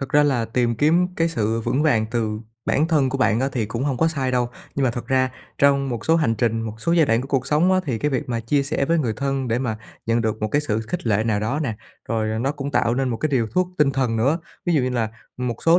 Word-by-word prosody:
thật 135 Hz, -, -4 dB
ra 150 Hz, +3 st, +4 dB
là 135 Hz, -6 st, +1 dB
tìm 120 Hz, +1 st, 0 dB
kiếm 165 Hz, +8 st, +3 dB
cái 165 Hz, 0 st, +2 dB
sự 115 Hz, -7 st, -1 dB
vững 135 Hz, +5 st, 0 dB
vàng 115 Hz, -8 st, +3 dB
từ 110 Hz, -3 st, -1 dB, 0.2 s
bản 155 Hz, +3 st, +1 dB
thân 150 Hz, -5 st, +3 dB
của 135 Hz, +1 st, -2 dB
bạn 115 Hz, -2 st, +2 dB
á 135 Hz, -, +1 dB
thì 115 Hz, -4 st, -1 dB
cũng 115 Hz, +4 st, -3 dB
hông 140 Hz, -3 st, 0 dB
có 160 Hz, +6 st, +3 dB
sai 135 Hz, -5 st, -1 dB
đâu. 125 Hz, -1 st, +1 dB, 0.3 s
Nhưng 140 Hz, -, +1 dB
mà 130 Hz, -, +3 dB
thật 120 Hz, +1 st, -6 dB
ra 130 Hz, -1 st, +2 dB, 0.3 s
trong 140 Hz, -1 st, +3 dB
một 120 Hz, -4 st, -4 dB
số 165 Hz, -, +4 dB
hành 150 Hz, -9 st, +2 dB
trình, 115 Hz, 0 st, 0 dB
một 110 Hz, -1 st, -5 dB
số 170 Hz, -, +1 dB
giai 165 Hz, -4 st, +4 dB
đoạn 115 Hz, +1 st, +2 dB
của 135 Hz, -, -7 dB
cuộc 135 Hz, -3 st, 0 dB
sống 165 Hz, +5 st, +3 dB
á, 185 Hz, -, +3 dB
thì 120 Hz, -5 st, -1 dB
cái 150 Hz, -, 0 dB
việc 140 Hz, +2 st, -2 dB
mà 115 Hz, -2 st, -1 dB
chia 140 Hz, +5 st, +1 dB
sẻ 145 Hz, 0 st, -1 dB
với 165 Hz, +3 st, +2 dB
người 120 Hz, -7 st, 0 dB
thân 135 Hz, -2 st, -1 dB
để 115 Hz, -, +1 dB
mà 115 Hz, -4 st, -2 dB, 0.3 s
nhận 115 Hz, +1 st, +2 dB
được 110 Hz, -1 st, -1 dB
một 110 Hz, -, +1 dB
cái 145 Hz, -, +2 dB
sự 110 Hz, -7 st, -1 dB
khích 120 Hz, +5 st, -5 dB
lệ 110 Hz, 0 st, +2 dB
nào 110 Hz, -3 st, +1 dB
đó 130 Hz, +8 st, -1 dB
nè, 115 Hz, -6 st, -2 dB, 0.3 s
rồi 110 Hz, -1 st, -1 dB
nó 135 Hz, +4 st, 0 dB
cũng 140 Hz, -1 st, -5 dB
tạo 120 Hz, -4 st, +2 dB
nên 135 Hz, +1 st, 0 dB
một 120 Hz, -, -1 dB
cái 155 Hz, -, -1 dB
liều 120 Hz, -4 st, +2 dB
thuốc 180 Hz, +11 st, 0 dB
tinh 150 Hz, -2 st, +4 dB
thần 130 Hz, -4 st, 0 dB
nữa. 135 Hz, +9 st, +2 dB, 0.3 s
Ví 175 Hz, -, +2 dB
dụ 145 Hz, -, +4 dB
như 130 Hz, -, 0 dB
là 120 Hz, -3 st, 0 dB, 0.3 s
một 125 Hz, -2 st, -2 dB
số 165 Hz, +1 st, +6 dB
130 Hz, 295 wpm, -22 LUFS, 115-145 Hz, 0.3 s, số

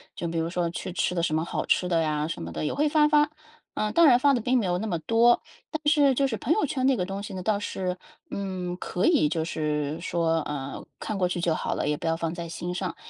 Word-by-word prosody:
就 170 Hz, -, -3 dB
比 165 Hz, -, -3 dB
如 165 Hz, 0 st, 0 dB
说 175 Hz, -1 st, -1 dB
去 175 Hz, +1 st, -5 dB
吃 180 Hz, -, 0 dB
的 175 Hz, -, 0 dB
什 160 Hz, -2 st, 0 dB
么 160 Hz, -, +1 dB
好 -, -, -3 dB
吃 180 Hz, -, +2 dB
的 170 Hz, -2 st, +2 dB
呀， 150 Hz, -1 st, 0 dB
什 165 Hz, -, -4 dB
么 85 Hz, 0 st, -6 dB
的， -, -, -3 dB
也 -, -, -1 dB
会 300 Hz, +2 st, +2 dB
发 300 Hz, 0 st, +4 dB
发。 295 Hz, -1 st, +4 dB, 0.4 s
呃， 215 Hz, 0 st, -1 dB
当 335 Hz, +6 st, +5 dB
然 255 Hz, -5 st, +7 dB
发 280 Hz, +3 st, +4 dB
得 250 Hz, -, +1 dB
并 250 Hz, +3 st, +1 dB
没 230 Hz, -, +1 dB
有 175 Hz, -1 st, +1 dB
那 215 Hz, +4 st, -3 dB
么 175 Hz, -5 st, -1 dB
多。 230 Hz, +7 st, +4 dB, 0.3 s
但 315 Hz, -, -4 dB
是 290 Hz, -3 st, +5 dB
就 275 Hz, -, +2 dB
是 225 Hz, -4 st, -3 dB
朋 250 Hz, +9 st, +1 dB
友 430 Hz, -, +1 dB
圈 260 Hz, -2 st, -1 dB
那 270 Hz, -, +4 dB
个 185 Hz, -6 st, -1 dB
东 195 Hz, +1 st, -5 dB
西 205 Hz, 0 st, -7 dB
呢 185 Hz, -1 st, -5 dB
倒 205 Hz, +1 st, +1 dB
是， 185 Hz, -3 st, -3 dB, 0.3 s
嗯， 185 Hz, -2 st, -4 dB
可 180 Hz, +1 st, -2 dB
以 310 Hz, -, +4 dB
就 160 Hz, +1 st, -1 dB
是 150 Hz, -1 st, -2 dB
说， 170 Hz, -1 st, 0 dB
呃， 140 Hz, -2 st, -5 dB, 0.2 s
看 215 Hz, -, -4 dB
过 185 Hz, -2 st, +2 dB
去 175 Hz, -1 st, -3 dB
就 170 Hz, -1 st, +2 dB
好 -, -, -2 dB
了， -, -, -2 dB
也 150 Hz, -, 0 dB
不 -, -, -4 dB
要 165 Hz, -, +2 dB
放 165 Hz, 0 st, -3 dB
在 170 Hz, -1 st, -5 dB
心 175 Hz, +1 st, -5 dB
上。 180 Hz, -1 st, -3 dB
180 Hz, 300 characters per minute, -26 LUFS, 165-235 Hz, 0.4 s, 然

